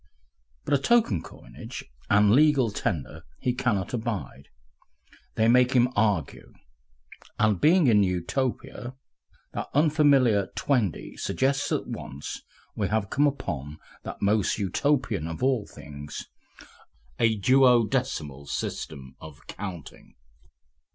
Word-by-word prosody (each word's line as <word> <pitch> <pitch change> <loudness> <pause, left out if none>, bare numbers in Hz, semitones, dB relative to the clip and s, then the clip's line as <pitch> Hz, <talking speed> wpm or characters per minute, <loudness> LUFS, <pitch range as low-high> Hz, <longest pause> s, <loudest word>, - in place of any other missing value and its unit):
But - - -1
a 140 - +4
token 175 - +2
coinage - - -10 0.2
and 100 0 +5
"legal 140 -3 +4
tender" 80 -7 -3 0.2
he 125 - 0
cannot 115 -7 -1
abide. 110 - -4 0.9
They 110 - +3
make 125 +1 +4
him 125 -1 +4
argue.) 105 -9 -1 0.8
And 105 -4 +2
being 170 +2 +5
in 110 -5 +5
Utopia, 120 +6 -2 0.6
that - - -4
unfamiliar 140 - +4
"twaindy" 120 - -1
suggests 135 +1 0
at - - 0
once 70 +2 -7 0.3
we 100 - -1
have 105 -2 -1
come 145 +2 +3
upon 75 - -4 0.2
that - - -7
most 105 0 +2
Utopian 105 - 0
of 80 +7 -6
all 130 -6 +1
things, 75 -1 -9 0.9
a 110 -2 +2
duodecimal 120 - +2
system 65 -2 -5
of 75 -2 -13
counting. 90 -6 -9
110 Hz, 110 wpm, -26 LUFS, 90-130 Hz, 0.9 s, and